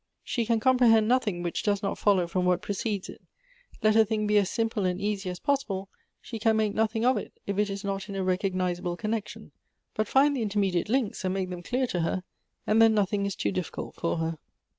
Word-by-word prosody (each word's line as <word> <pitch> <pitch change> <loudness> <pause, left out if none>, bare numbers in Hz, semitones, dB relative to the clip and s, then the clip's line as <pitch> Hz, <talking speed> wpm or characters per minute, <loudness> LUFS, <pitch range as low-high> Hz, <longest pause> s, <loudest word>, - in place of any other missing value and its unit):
She 235 -3 -2
can 230 -1 +2
comprehend 230 -3 +4
nothing 215 -8 +1
which 175 - -2
does 205 -1 0
not 195 - -2
follow 195 -4 +3
from 180 +2 -1
what 180 0 +1
precedes 205 -1 -2
it; - - -11 0.6
let 215 0 +4
a 225 - +7
thing 215 0 -1
be 210 0 +1
as 195 -2 0
simple 225 -3 -1
and 180 0 0
easy 200 -2 -2
as 180 -1 -6
possible, 210 -9 -1 0.3
she 225 - -7
can 220 0 +3
make 215 -2 +1
nothing 220 +1 0
of 255 +1 +4
it - - -7
if 200 0 -2
it 210 0 +2
is 195 0 -5
not 195 0 -3
in 200 - -5
a 195 - -1
recognizable 185 -1 -1
connection; 215 0 -4 0.4
but 215 0 -1
find 285 +4 +4
the 255 - -2
intermediate 200 -3 0
links, 235 -6 0
and 185 0 -1
make 185 -1 -2
them 180 -1 -5
clear 255 +8 0
to 185 -7 -2
her, 175 +2 -1 0.4
and 220 +1 +3
then 225 -1 +6
nothing 200 -1 +1
is 200 - -4
too - - -1
diffi 185 -2 -3
cult - - -6
for 170 - -1
her. 160 -1 -2
205 Hz, 225 wpm, -27 LUFS, 185-225 Hz, 0.6 s, a